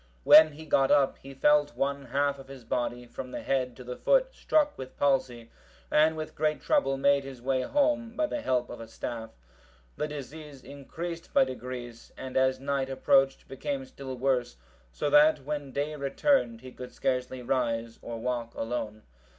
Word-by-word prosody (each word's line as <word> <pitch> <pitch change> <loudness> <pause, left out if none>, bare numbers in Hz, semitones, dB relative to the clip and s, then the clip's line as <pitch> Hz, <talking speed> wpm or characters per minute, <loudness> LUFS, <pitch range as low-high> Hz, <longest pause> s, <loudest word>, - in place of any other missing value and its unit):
When 155 - +8
he 160 +2 -10
got 135 -3 +3
up, 140 -2 +3
he 135 0 -11
felt 145 +1 +3
one 140 0 -1
half 140 +2 0
of 135 - -12
his 135 -2 -11
body, 120 +1 -2
from 125 +1 -8
the - - -6
head 130 -3 -1
to 125 - -11
the 125 0 -6
foot, - - +2
struck 300 -8 +1
with 130 -1 -9
palsy, 130 -4 0 0.4
and 155 +1 +4
with 155 0 -5
great 155 0 0
trouble 285 - +1
made 140 0 +3
his 135 -2 -9
way 130 +1 0
home 280 - 0
by 310 - +1
the 300 -1 -3
help 125 - 0
of 120 - -8
a 115 - -8
staff. 115 0 -6 0.7
The 150 - -1
disease 150 -1 -9
increased 165 +5 -7
by - - +7
degrees, 125 -2 -7
and 130 -1 -7
as 130 0 +2
night 135 -1 -1
approached, 135 0 +2
became 270 - -4
still 135 - -8
worse, 125 - 0 0.3
so - - -2
that 150 -1 +5
when 145 -2 -4
day 145 +3 -2
returned, 140 - +1
he 130 0 -10
could 125 0 -9
scarcely 125 -1 -2
rise 115 -2 -1
or 115 -1 -6
walk 120 0 -3
alone. 110 -2 -4
135 Hz, 180 wpm, -28 LUFS, 125-150 Hz, 0.7 s, When